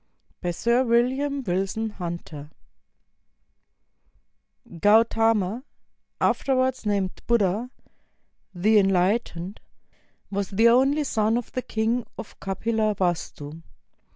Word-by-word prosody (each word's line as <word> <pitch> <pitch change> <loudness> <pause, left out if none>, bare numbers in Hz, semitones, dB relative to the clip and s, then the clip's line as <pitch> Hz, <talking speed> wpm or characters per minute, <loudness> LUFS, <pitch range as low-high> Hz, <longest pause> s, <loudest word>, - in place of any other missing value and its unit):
] - - -41
BY 175 - -2
SIR 235 +8 +1
WILLIAM 265 +4 +1
WILSON 195 +3 -2
HUNTER 170 -6 -7 2.3
Gautama, 225 +1 +3 0.6
afterwards 260 -3 +1
named 200 -2 -1
Buddha, 225 0 +1 0.8
"The 205 +4 +3
Enlight 195 +3 +2
ened," 175 +5 -7 0.7
was 200 -1 -2
the 225 +4 +4
only 270 +5 +3
son 225 -4 +1
of 245 - -5
the 255 - -3
Kjng 225 +1 -1
of - - -10
Kapilavastu. 190 -7 -2
220 Hz, 95 wpm, -25 LUFS, 190-235 Hz, 2.3 s, the